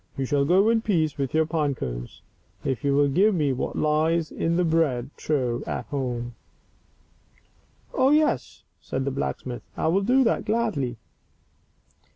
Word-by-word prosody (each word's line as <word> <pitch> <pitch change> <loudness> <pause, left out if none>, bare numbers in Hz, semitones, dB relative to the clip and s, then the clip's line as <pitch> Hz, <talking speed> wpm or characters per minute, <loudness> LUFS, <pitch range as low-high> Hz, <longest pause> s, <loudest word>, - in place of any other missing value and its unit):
You 135 - -1
shall 140 +1 +1
go 185 +7 +4
in 230 -1 +3
peace 160 -10 0
with 135 -2 -1
your 160 0 +4
pine 155 -3 0
cones - - -6 0.4
if 130 -5 -2
you 140 -1 +2
will 145 0 +4
give 195 +9 +3
me 145 -5 +1
what 130 - -3
lies 155 +2 +1
in 165 +1 -1
the 180 - +2
bread 150 -6 +1
trough 125 -6 -1
at - - -3
home." 120 -4 -3 0.8
" - - -36
Oh, 260 - +3
yes." 305 +1 +1 0.2
said 130 0 -3
the 140 - -1
blacksmith, 130 -2 -4
" - - -26
I - - +1
will 190 +4 +2
do 255 +6 +3
that 230 - +1
gladly." 205 - -1
150 Hz, 170 wpm, -25 LUFS, 130-180 Hz, 0.8 s, go